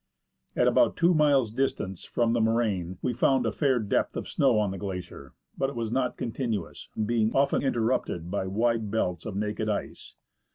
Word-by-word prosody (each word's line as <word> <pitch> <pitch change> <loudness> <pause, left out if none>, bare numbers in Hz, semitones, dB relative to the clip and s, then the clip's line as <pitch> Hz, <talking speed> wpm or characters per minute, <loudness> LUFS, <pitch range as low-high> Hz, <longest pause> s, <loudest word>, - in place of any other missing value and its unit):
At - - +3
about - - +3
two 170 +2 +4
miles' 140 -7 +3
distance 110 -7 -2
from 115 -1 0
the 120 - +2
moraine, 105 -6 0
we 125 - 0
found 125 +1 +2
a 115 - +1
fair 130 +3 +1
depth 110 -4 0
of - - -4
snow - - +2
on 105 -2 +1
the 95 - -6
glacier, 90 -8 -7 0.2
but 135 - 0
it 140 - -9
was 115 -2 -3
not 125 0 0
continuous, 115 -6 -4 0.2
being 110 -1 +1
often 140 +1 +3
interrupted 115 -9 -1
by 95 -1 -1
wide 110 +2 0
belts 90 -6 -1
of 105 - -5
naked 105 +1 -2
ice. 105 - -4
110 Hz, 180 wpm, -27 LUFS, 100-125 Hz, 0.2 s, two